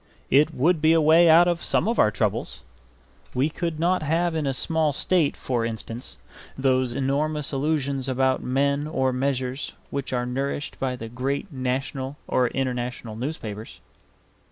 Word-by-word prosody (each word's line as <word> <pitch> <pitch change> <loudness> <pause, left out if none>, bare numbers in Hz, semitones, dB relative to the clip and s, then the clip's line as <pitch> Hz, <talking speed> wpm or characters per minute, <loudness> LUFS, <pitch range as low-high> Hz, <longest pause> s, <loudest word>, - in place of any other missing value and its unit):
It 150 +4 +5
would 160 +5 +2
be 160 +1 +5
a 165 - +5
way 160 +2 +6
out 170 +2 +7
of 175 -1 0
some - - +1
of 230 - 0
our 105 - +6
troubles; 100 - -2 0.7
we 135 +5 +1
could 165 -1 -3
not 180 +3 +2
have 165 +3 +1
in 155 -3 -1
a - - +2
small 155 +3 0
state, 165 0 +1
for 120 -3 -1
instance, 115 +1 -5 0.4
those 130 -2 +1
enormous 145 +2 -1
illusions 140 -2 -1
about 130 0 +1
men 140 +3 0
or 130 -4 0
measures 130 0 -2 0.2
which 140 -1 -3
are 125 -1 0
nourished 135 +3 -3
by 130 -1 -1
the 115 -2 -7
great 135 - -3
national 130 +1 -3
or 125 -1 +2
international 125 -3 -3
newspapers. 110 -4 -6
135 Hz, 155 wpm, -24 LUFS, 125-155 Hz, 0.7 s, out